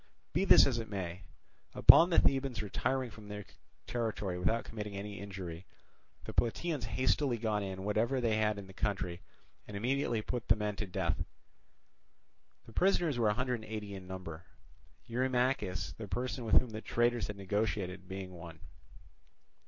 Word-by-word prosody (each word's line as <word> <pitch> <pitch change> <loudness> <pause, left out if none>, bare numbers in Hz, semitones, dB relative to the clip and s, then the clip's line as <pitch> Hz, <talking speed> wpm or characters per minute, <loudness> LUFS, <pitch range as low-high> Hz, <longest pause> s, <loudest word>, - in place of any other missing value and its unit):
Be 185 +5 +2
this - - +9
as 120 -4 0
it 115 - -5
may, 90 -3 -4 0.5
upon 170 - +9
the 170 - +2
Thebans 135 -5 +2
retiring 130 +4 -1
from 105 -1 -12
their 105 -1 -6 0.4
territory 105 -6 -2
without 115 +6 +1
committing 105 -2 -6
any 100 -1 -6
injury, 95 -3 -7 0.6
the - - -7
Plataeans 145 +5 0
hastily 130 0 +1
got 110 -2 0
in 95 -1 -5
whatever 110 +6 +1
they 115 -3 +1
had 105 -1 +1
in 100 - -7
the 95 - -13
country 90 -3 -2 0.5
and 105 - -6
immediately 120 -1 0
put 120 0 -4
the 110 - +6
men 105 -1 -2
to 105 - -3
death. 90 - -1 1.4
The 115 - -14
prisoners 175 - +2
were 110 -2 +4
a 105 - +1
hundred 125 -1 -1
and - - -10
eighty 105 -2 -5
in 95 -2 -8
number; 90 -3 -7 0.6
Eurymachus, 125 -5 0
the 110 - -7
person 125 +3 -3
with 110 - +3
whom 125 - -6
the 110 0 -5
traitors 120 -2 +1
had 105 - -6
negotiated, 95 -2 -2
being 95 0 -6
one. 85 -2 -10
110 Hz, 165 wpm, -33 LUFS, 95-120 Hz, 1.4 s, this